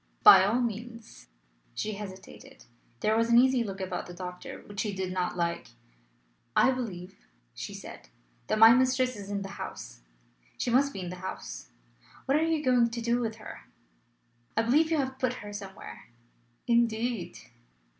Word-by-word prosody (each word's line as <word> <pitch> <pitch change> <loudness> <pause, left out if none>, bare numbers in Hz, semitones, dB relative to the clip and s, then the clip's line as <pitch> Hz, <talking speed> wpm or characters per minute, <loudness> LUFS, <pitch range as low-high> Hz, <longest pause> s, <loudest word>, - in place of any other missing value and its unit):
"By - - +10
all 215 +6 +2
means." 230 0 -6 0.5
She 215 - -2
hesitated. 195 -2 -10 0.4
There 215 +1 +2
was 230 +1 +2
an 235 - +6
easy 255 0 +5
look 195 -3 -6
about 185 -1 -4
the 175 - -9
doctor 180 0 -8
which 205 -1 -9
she 205 -2 -1
did 190 -1 -3
not 180 -1 -2
like. 170 -1 -1 0.9
"I 260 - +5
believe," 195 - -6 0.3
she - - -7
said, - - -11 0.4
"that - - +1
my 225 +1 +9
mistress 255 0 +2
is 200 -1 -9
in 200 -1 -2
the 195 0 -8
house. - - -8 0.6
She 240 - -1
must 280 +3 +3
be 195 - -6
in 180 -1 -5
the 180 - -7
house. 180 - -7 0.6
What 270 - +2
are 305 - +3
you 320 -2 0
going 245 -2 +4
to 235 +1 -5
do 235 +1 +1
with 225 -2 -2
her? 220 - -11 0.9
I 225 - +4
believe 300 +8 +3
you 325 - +1
have 265 -2 -2
put 255 -1 +1
her 205 -4 -9
somewhere." 190 - -9 0.6
"Indeed!" 235 -3 0
225 Hz, 170 wpm, -29 LUFS, 190-250 Hz, 0.9 s, By